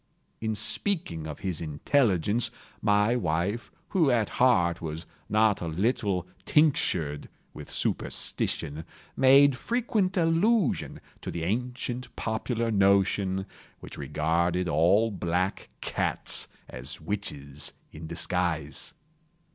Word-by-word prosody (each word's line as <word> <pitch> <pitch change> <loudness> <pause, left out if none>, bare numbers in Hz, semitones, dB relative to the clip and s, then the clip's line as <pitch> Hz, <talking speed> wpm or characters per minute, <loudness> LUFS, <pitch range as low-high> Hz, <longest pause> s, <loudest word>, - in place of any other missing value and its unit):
In 110 -1 -2
speaking 110 - -1
of 75 - -7
his 90 -5 -2
intelligence, 100 - +1 0.3
my 105 +2 +3
wife, 95 +3 -1 0.2
who 170 -7 +3
at 115 -4 +2
heart 90 -10 +4
was 80 0 -5 0.2
not 110 -1 +3
a 85 - -3
little 95 +1 0 0.2
tinctured 90 - +2 0.2
with - - -9
superstition, 75 +3 -1 0.3
made 135 +1 +6
frequent 215 - 0
allusion 175 - +2 0.2
to - - -5
the 85 - -4
ancient 125 +5 -3
popular 115 +1 -1
notion, 95 -1 +2 0.3
which - - -9
regarded 85 +3 0
all 95 +8 +3
black 90 0 -1
cats - - 0 0.2
as 65 +10 -7
witches 75 -9 -3 0.2
in 80 +1 -8
disguise. 85 -1 -2
100 Hz, 105 wpm, -28 LUFS, 85-125 Hz, 0.3 s, made